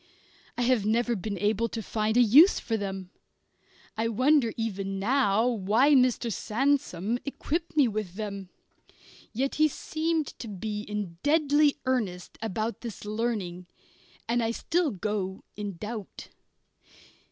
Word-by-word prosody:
I 245 - +1
have 245 -3 +3
never 235 +3 +1
been 200 +1 -4
able 215 +4 +1
to 225 0 -5
find 220 +2 0
a 245 - +7
use 285 - +7
for 225 - -2
them. 195 -3 -4 0.8
I 225 +1 0
wonder 255 +2 +3
even 195 -3 -3
now 225 0 +2
why 230 +5 +3
Mr. 250 -3 +3
Sandsome 240 - 0
equipped 315 +3 -3
me 280 -4 +6
with 210 -5 -4
them. 200 -3 -5 0.8
Yet 265 +4 -1
he 310 - +7
seemed 315 +1 -1
to 235 - -6
be 210 +1 -4
in 205 -5 -5
deadly 295 -1 +3
earnest 210 -9 -2
about 220 +1 -3
this 230 -4 -7
learning, 210 -5 -3 0.6
and 235 +1 +1
I 225 - 0
still 330 +8 0
go 195 -2 -3
in 205 -3 -5
doubt. 210 +1 -7
225 Hz, 135 wpm, -28 LUFS, 205-255 Hz, 0.8 s, a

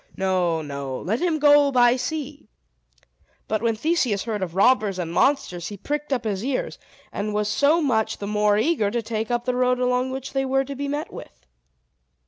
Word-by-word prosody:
No, 180 -4 0
no; 140 -2 -5
let 215 +6 -2
him 345 -3 +1
go 290 -1 +5
by 245 -1 +5
sea." 290 -2 -5 1.0
But 215 -1 -1
when 230 -1 +1
Theseus 245 - 0
heard 215 -3 -3
of 175 -2 -4
robbers 210 -2 +3
and 170 -2 -4
monsters, 180 - +1
he 205 - -7
pricked 295 +7 -4
up 250 -3 0
his 205 -2 -2
ears, 265 0 -3 0.3
and 210 +1 -3
was 210 0 0
so 290 +9 +2
much 220 -6 0
the 200 - -6
more 210 0 +2
eager 220 -3 +1
to 235 +2 -2
take 220 0 -3
the 240 +1 -1
road 250 0 +2
along 250 +1 +1
which 265 0 -6
they 270 -1 0
were 270 0 +1
to 280 +1 -6
be 285 +1 -4
met 290 +2 -4
with. - - -12
240 Hz, 190 wpm, -23 LUFS, 205-275 Hz, 1.0 s, go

